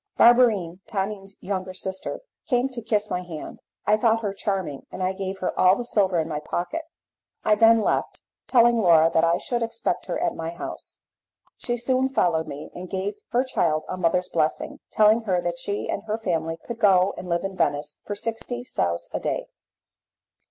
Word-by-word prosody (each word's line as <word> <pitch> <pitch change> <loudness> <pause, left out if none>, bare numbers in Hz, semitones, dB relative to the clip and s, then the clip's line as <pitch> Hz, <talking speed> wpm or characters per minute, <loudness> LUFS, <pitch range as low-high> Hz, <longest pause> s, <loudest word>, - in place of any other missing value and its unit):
Barberine, 220 -8 +5
Tonine's 195 -1 -3
younger 185 -1 -4
sister, 190 0 -2 0.3
came 250 +1 +2
to 250 -3 -6
kiss 210 -2 0
my 180 - -1
hand. 170 -4 -8 0.3
I 210 +1 +4
thought 225 0 +2
her 200 -2 -1
charming, 190 -8 -3
and 185 - -4
I 185 +1 +1
gave 190 0 -4
her 185 - -1
all 185 +1 +6
the 245 - -4
silver 195 -6 +2
in 160 - -1
my 150 -2 -3
pocket. 175 - -3 0.6
I 215 - +5
then 225 +1 +6
left, - - -1 0.3
telling 240 -1 +5
Laura 165 -3 +5
that 160 - +3
I 165 +1 +3
should 240 +5 -2
expect 230 0 -2
her - - -2
at 345 -1 0
my 165 0 -4
house. 170 +1 -7 0.6
She 240 0 -2
soon 260 +2 +1
followed 170 -10 +1
me, 145 +2 -8
and 180 0 -8
gave 195 +2 -2 0.2
her 245 +1 +2
child 160 -12 0
a - - -3
mother's 180 0 +1
blessing, 170 - -1
telling 215 +2 +5
her 185 -4 +2
that 175 0 -2
she 200 +3 -3
and - - -2
her 215 0 -1
family 165 -6 -2
could 235 -1 -6
go 195 -3 +4
and 180 - -8
live 170 0 0
in 195 0 -4
Venice 150 -3 -1
for 205 - -4
sixty 230 +3 -3
sous 85 - -1
a - - -1
day. - - -3
195 Hz, 190 wpm, -24 LUFS, 175-225 Hz, 0.6 s, all